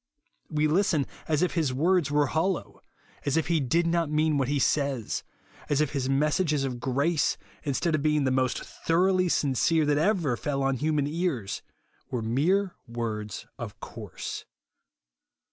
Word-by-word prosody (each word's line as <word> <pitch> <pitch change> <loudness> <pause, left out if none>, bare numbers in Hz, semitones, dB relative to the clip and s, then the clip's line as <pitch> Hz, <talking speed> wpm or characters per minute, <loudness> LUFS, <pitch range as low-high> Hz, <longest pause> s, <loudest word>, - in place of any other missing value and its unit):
We 155 0 +2
listen, 160 -3 +2 0.2
as 155 +1 +2
if 180 - +1
his 160 -6 +1
words 165 +3 +2
were 145 0 +3
hollow; 165 +6 -1 0.4
as 140 +1 +1
if 160 - 0
he 165 -2 +3
did 160 +6 +2
not 170 -2 +1
mean 155 -1 +2
what 130 - +1
he 145 +1 +1
says; 140 -4 0 0.5
as 145 - +2
if 150 -3 +1
his 135 -3 -1
mes 145 +2 +2
sages 155 -6 +1
of 125 -3 -3
grace, 140 +6 +1 0.3
instead 150 +4 0
of 155 - +1
being 150 -1 +2
the 130 - +2
most 130 -1 +1
thoroughly 185 +2 +1
sincere 155 +2 +2
that 145 0 +2
ever 165 - +2
fell 140 +2 -2
on 135 -1 +1
humun 150 -1 +1
ears, 150 - -2 0.5
were 120 -3 -2
mere 175 - +1
words 110 -3 -4
of - - -7
course. - - -7
150 Hz, 160 wpm, -27 LUFS, 135-165 Hz, 0.5 s, were